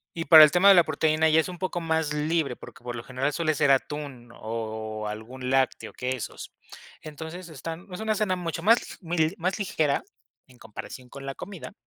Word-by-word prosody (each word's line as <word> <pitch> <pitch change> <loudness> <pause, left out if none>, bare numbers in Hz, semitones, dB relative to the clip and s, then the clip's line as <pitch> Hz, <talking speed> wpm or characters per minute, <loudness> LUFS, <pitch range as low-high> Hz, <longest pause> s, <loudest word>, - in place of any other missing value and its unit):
Y 165 -1 -3
para 160 -2 +10
el 150 - +7
tema 185 +3 +6
de 195 - +10
la 175 - +7
proteína 155 +1 +2
ya 155 +1 +5
es 160 - 0
un 180 - -8
poco 185 -2 -2
más 160 -2 -1
libre, 150 -3 0
porque, - - -13
por 120 0 -5
lo 120 - -6
general, 135 +3 -2
suele 160 -1 0
ser 145 -1 +3
atún 135 -3 -2
o 110 -1 -5
algún 120 +5 -6
lácteo, 135 0 0
quesos. 125 -1 -5 0.5
Entonces, 160 +3 -8
están 165 +5 -7
es 180 - -6
una 220 0 0
cena 200 -3 0
mucho 165 -2 -4
más 225 +4 +6 0.2
l 165 -2 +1
mi 160 - -6
más 185 +4 -2
ligera, 155 -7 0 0.5
en 125 -1 -20
comparación 125 +3 -10
con 140 +1 -10
la 135 0 -5
comida, 195 -1 -9
155 Hz, 200 wpm, -26 LUFS, 130-170 Hz, 0.5 s, para